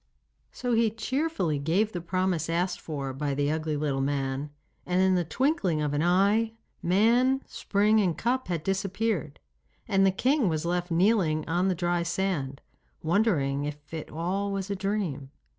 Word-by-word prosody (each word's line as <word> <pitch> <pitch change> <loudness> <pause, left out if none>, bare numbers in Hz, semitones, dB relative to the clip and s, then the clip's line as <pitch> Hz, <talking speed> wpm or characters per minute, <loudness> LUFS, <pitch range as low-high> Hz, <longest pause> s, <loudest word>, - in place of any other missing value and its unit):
So 245 -1 -2
he 230 -1 +3
cheerfully 225 - -1
gave 180 +9 +1
the 175 - -4
promise 180 -2 -1
asked 175 +2 -1
for 140 -4 -4
by 140 +1 -2
the 145 +1 +1
ugly 155 -1 -1
little 145 -2 -1
man, 135 0 -1 0.3
and 180 +1 0
in 190 0 +4
the 180 -1 +2
twinkling 195 - 0
of 150 -1 -1
an 145 - +1
eye, 200 +6 +3 0.3
man, 235 +9 +3
spring, 210 +2 +1
and 180 -6 +1
cup 255 +3 0
had 170 -4 -2
disappeared, 195 -3 -1 0.5
and 195 -1 +3
the 195 - +6
king 250 +4 +2
was 155 0 -2
left 175 +1 -1
kneeling 170 -3 +2
on 175 +4 +1
the 185 - +1
dry 175 0 0
sand, 170 -6 -2 0.4
wondering 160 -7 +1
if 145 +1 -8
it 160 -2 -5
was - - -9
all 195 +4 -1
a 195 +1 -3
dream. 190 -9 -2
180 Hz, 165 wpm, -27 LUFS, 155-205 Hz, 0.5 s, the